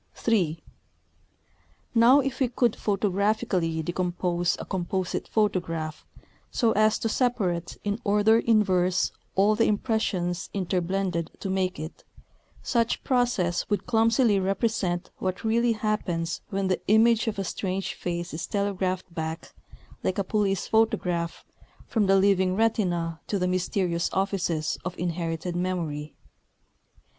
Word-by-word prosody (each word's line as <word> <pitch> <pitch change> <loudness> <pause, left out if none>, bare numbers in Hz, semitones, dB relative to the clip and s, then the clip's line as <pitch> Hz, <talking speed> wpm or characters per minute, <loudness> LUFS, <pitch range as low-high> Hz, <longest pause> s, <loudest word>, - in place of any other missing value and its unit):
III 170 -8 +2 1.3
Now 245 +4 +6
if 270 -1 -3
we 260 - +3
could 240 -2 +1
photographically 200 -4 0
decompose 175 0 -1
a - - -5
composite 185 0 -2
photograph 175 -7 -1 0.4
so 230 -3 +2
as 215 0 +3
to - - -2
separate 210 -8 0
in 205 +1 -1
order 210 +2 +4
inverse 185 -6 +2 0.2
all 200 +3 +4
the 225 +2 +2
impressions 205 -5 -1
interblended 185 -2 -1
to 195 - -3
make 190 -1 -1
it, 155 +2 -8 0.6
such 235 -2 0
process 240 -9 +1
would 205 - 0
clumsily 225 -2 +3
represent 190 -2 -1
what 185 -1 -3
really 230 +1 +2
happens 195 -6 -2
when 195 -2 -1
the 185 - 0
image 225 +2 +4
of 220 - -1
a 195 - -1
strange 190 0 -3
face 175 -1 -4
is 160 - -4
telegraphed 190 -3 -2
back 160 0 -5 0.5
like 185 - 0
a 200 - +1
police 195 -1 0
photograph 180 -7 0 0.4
from 215 -4 +1
the 195 - +5
living 190 -1 +3
retina 180 -7 0
to 205 - 0
the 180 -1 0
mysterious 180 -1 0
offices 180 -6 -1
of 180 0 -5
inherited 170 0 -3
memory. 165 -5 -3
190 Hz, 125 wpm, -26 LUFS, 175-215 Hz, 1.3 s, Now